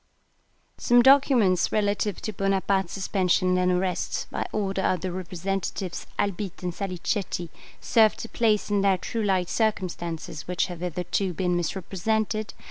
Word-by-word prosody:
Some 240 0 +5
documents 260 -9 +5
relative 205 -1 0
to 215 - -3
Bonaparte's 195 -1 0
suspension 185 -1 +1
and 180 0 +2
arrest, 180 0 -1
by - - -3
order 195 -2 -1
of 185 -2 +1
the 185 - -3
representatives 185 0 -4
Albitte 195 -2 -2
and 180 -1 -2
Salicetti, 180 -1 -3 0.3
serve 220 -2 +4
to - - -6
place 215 -3 +1
in 205 -1 +2
their 195 -1 +3
true 225 +4 -4
light 190 -4 +1
circumstances 175 -8 -2
which 180 -1 0
have 175 -3 -7
hitherto 180 +2 -2
been 180 +1 0
misrepresented. 205 +5 -2
190 Hz, 135 wpm, -26 LUFS, 180-210 Hz, 0.3 s, Some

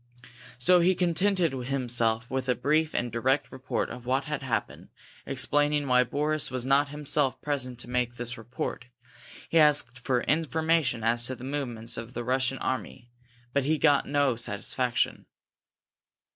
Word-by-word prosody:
So 180 +9 +5
he 180 +2 +3
contented 180 -1 +2
himself 125 -3 0
with 130 0 -2
a 125 - +3
brief 155 +4 +1
and 120 0 -1
direct 130 +5 0
report 130 0 -3
of 125 0 -9
what 130 +2 +1
had 150 -2 -4
happened, 125 -4 -3 0.4
explaining 145 0 +2
why 125 -1 +4
Boris 150 +4 -1
was 130 -1 -3
not 140 +2 +3
himself 145 -2 0
present 130 -4 -2
to - - -11
make 125 -1 -1
this 120 0 -5
report. 120 +1 -5 0.6
He 165 - +3
asked 145 -5 +4
for 125 -1 0
information 160 -5 +1
as 120 +1 +3
to 130 - -4
the 125 - -12
movements 120 -4 -3
of 115 +1 -8
the 120 - -3
Russian 130 +2 0
army, 130 -2 -4 0.4
but 140 - +2 0.2
got 145 -3 +3
no 140 -3 +2
satisfaction. 120 +2 -2
130 Hz, 150 wpm, -27 LUFS, 120-145 Hz, 0.6 s, So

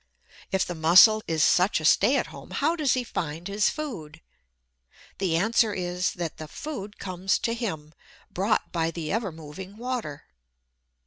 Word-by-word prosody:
If 190 -1 +1
the 175 - -4
Mussel 180 +7 +7
is 160 -2 +1
such 180 +3 +3
a - - -5
stay - - +4
at - - 0
home, - - -11
how 315 +4 0
does 300 -6 +1
he 255 - -1
find 165 -5 -4
his 205 +1 +2
food? 185 - -6 1.0
The 180 -4 +1
answer 220 +3 +2
is, 180 0 -1
that 170 -3 -5
the 155 - -7
food 210 - -7
comes 185 0 -1
to 230 - -1
him, 160 -11 -5 0.4
brought 200 +4 0
by 165 -1 0
the 165 -2 -5
ever 220 -3 -1
moving 165 +6 -10
water. 235 - -4
185 Hz, 165 wpm, -26 LUFS, 165-225 Hz, 1.0 s, Mussel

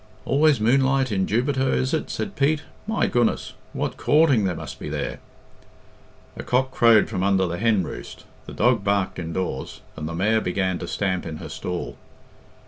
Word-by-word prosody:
"Always 145 -2 +3
moonlight 130 +3 +2
in 95 -2 0
Jubiter, 130 +3 +1
is 130 +3 0
it?" 160 - -1
said 200 - -4
Pete. 150 +1 +1 0.2
"My 220 -1 +1
goodness! 120 -2 0 0.2
What - - -3
coorting 145 -9 +4
there 90 -2 -1
must - - -8
be - - -6
there!" - - -3 1.2
A - - -6
cock 130 +1 0
crowed 115 -4 +5
from 95 -5 -3
under 95 -1 +2
the 85 0 -3
hen 110 -4 +2
roost, - - -8 0.2
the - - -8
dog 120 -2 +2
barked 100 -2 0
indoors, 85 -4 -4
and 75 0 -5
the 85 - -5
mare 110 +5 +2
began 95 -1 -1
to 85 - -5
stamp 95 -2 -1
in 80 -1 -5
her 80 - -8
stall. 85 +4 -5
110 Hz, 175 wpm, -23 LUFS, 90-130 Hz, 1.2 s, crowed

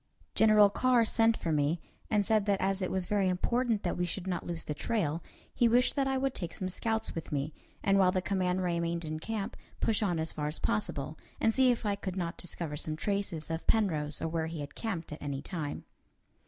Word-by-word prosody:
General 215 -2 +6
Carr 250 0 +4
sent 225 0 +3
for 165 - -2
me, 150 +2 +2 0.3
and 210 -2 +2
said 215 -1 +2
that 200 -1 +3
as 195 +1 +1
it 185 - 0
was 190 -1 -1
very 195 0 +2
important 230 +4 +1
that 175 - -1
we 180 - +2
should 180 +1 -3
not 185 -2 -2
lose 170 -2 -4
the 150 - -3
trail, 165 -2 -1 0.3
he 240 - +4
wished 245 +2 +4
that 275 -2 +2
I 270 0 +1
would 270 0 0
take 175 -2 -4
some 185 - -3
scouts 220 +4 -1
with 165 - -6
me, 145 +1 -1 0.3
and 195 0 +4
while 185 -1 +5
the 185 - +1
command 185 -1 0
remained 170 -1 -1
in 155 0 -3
camp, 210 +3 -3 0.2
push 225 -1 +1
on 180 -5 +1
as 160 0 -1
far 150 -1 -2
as 150 - -3
possible, 135 +8 -2 0.2
and 225 - +3
see 260 +1 +5
if 240 -2 +1
I 205 - +2
could 195 -2 -4
not 170 -1 -2
discover 165 -4 -5
some 155 +1 -2
traces 195 -3 -2
of 165 +1 -4
Penrose 155 -9 +1
or - - +1
where 160 0 -1
he 160 -2 -5
had 145 - -7
camped 190 -9 -4
at 150 - -7
any 140 -1 -3
time. 155 -6 -4
185 Hz, 225 wpm, -31 LUFS, 160-215 Hz, 0.3 s, General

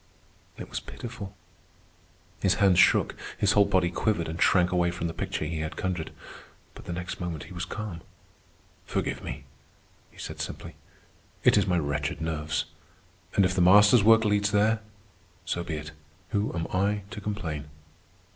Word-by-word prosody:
It - - -7
was - - -4
pitiful. 105 -5 -8 1.0
His 95 0 +3
hands 95 -1 +4
shook, - - +4 0.2
his 105 - +3
whole 105 -1 +5
body 90 -3 +2
quivered 90 -3 0
and 80 +2 -5
shrank 90 -1 +4
away 90 -1 +2
from 85 0 -4
the 80 - -2
picture 75 - -3
he 80 +1 -3
had 80 0 -4
conjured. 90 -4 -2 0.6
But - - -12
the - - -5
next 90 +1 -5
moment 85 -4 -4
he 95 - -11
was 90 +1 -3
calm. 105 -6 -6 0.9
"Forgive - - -2
me," - - -6 0.7
he - - -23
said - - -6
simply. - - -6 0.7
"It - - +6
is 105 -1 +3
my 90 -1 +2
wretched 75 -2 -1
nerves. 80 -1 -2 0.7
And 100 - +5
if 90 - +1
the 90 - +1
Master's 105 +4 +7
work 115 +1 +6
leads 105 0 +2
there, 105 +2 +3 0.7
so 85 0 -2
be 80 - -4
it. 75 0 -6 0.4
Who 105 -1 0
am 80 -1 -1
I 100 +2 +1
to 105 - -6
complain?" 85 -8 -4
90 Hz, 165 wpm, -27 LUFS, 80-105 Hz, 1.0 s, Master's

